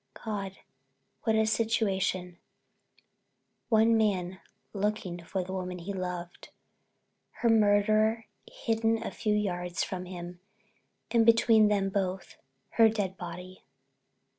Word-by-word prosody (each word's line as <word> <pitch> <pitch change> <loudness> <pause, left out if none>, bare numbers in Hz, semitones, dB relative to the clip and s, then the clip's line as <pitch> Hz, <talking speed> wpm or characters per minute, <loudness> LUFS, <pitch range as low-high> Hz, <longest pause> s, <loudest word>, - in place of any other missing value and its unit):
God, 195 -3 -4 0.7
what 220 - +3
a 220 0 +3
situation—one 215 +1 -2
man 190 -4 0 0.3
looking 200 -4 -2
for 185 +2 -3
the 185 +1 -7
woman 180 -1 -4
he 180 +3 -6
loved, 180 -2 -6 0.8
her 235 - 0
murderer 215 +1 +3 0.3
hidden 225 0 0
a - - -4
few 210 -2 -1
yards 180 -4 -1
from 185 -1 -5
him, 175 -1 -8 0.7
and 230 -1 +4
between 225 -1 +5
them 200 -2 +1
both 190 -2 -3 0.4
her 225 -1 +7
dead 200 -4 -2
body!" 180 +1 -9
200 Hz, 110 wpm, -29 LUFS, 180-220 Hz, 0.8 s, her